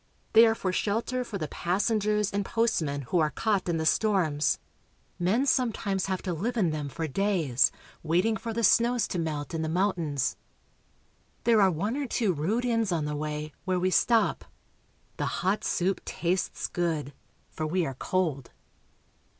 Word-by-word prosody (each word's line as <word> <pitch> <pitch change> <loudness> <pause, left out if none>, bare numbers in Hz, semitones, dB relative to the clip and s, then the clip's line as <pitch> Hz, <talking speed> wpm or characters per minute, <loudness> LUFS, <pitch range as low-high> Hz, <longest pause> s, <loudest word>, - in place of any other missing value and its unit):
They 225 +1 +8
are 225 - +2
for 185 -4 -2
shelter 230 +6 -1
for 220 -4 -5
the 155 -5 -3
passengers 210 +4 0
and 200 0 -1
postmen 160 -11 0
who 170 +8 0
are 155 -1 +3
caught 200 0 0
in 170 - +1
the 160 - -2
storms. 160 -6 +2 0.6
Men 205 +10 +2
sometimes 220 -8 0
have 190 -1 -2
to 180 - -2
live 225 +9 -2
in 180 -7 +2
them 150 -2 -3
for 160 +3 -4
days, 165 -6 +2 0.3
waiting 180 +8 +1
for 230 +1 -5
the 230 +1 -2
snows 235 +3 +4
to 180 - -2
melt 155 -1 -3
in 165 - -2
the 160 - -2
mountains. 170 -6 0 1.1
There 225 -2 +4
are 195 - +6
one 200 +8 -2
or 285 -1 -2
two 220 -5 +1
rude 200 +11 -1
inns 230 -4 +1
on 160 -3 0
the 150 0 -3
way, 150 0 -4
where 185 -1 +1
we 185 +1 +1
stop; 230 +4 +2 0.7
the - - -1 0.2
hot 190 +3 +1
soup 185 +1 0
tastes 180 +2 -2
good, 160 -5 -2 0.4
for 155 - -3
we 175 +2 0
are 135 - -3
cold. 150 -2 -1
185 Hz, 170 wpm, -28 LUFS, 160-220 Hz, 1.1 s, They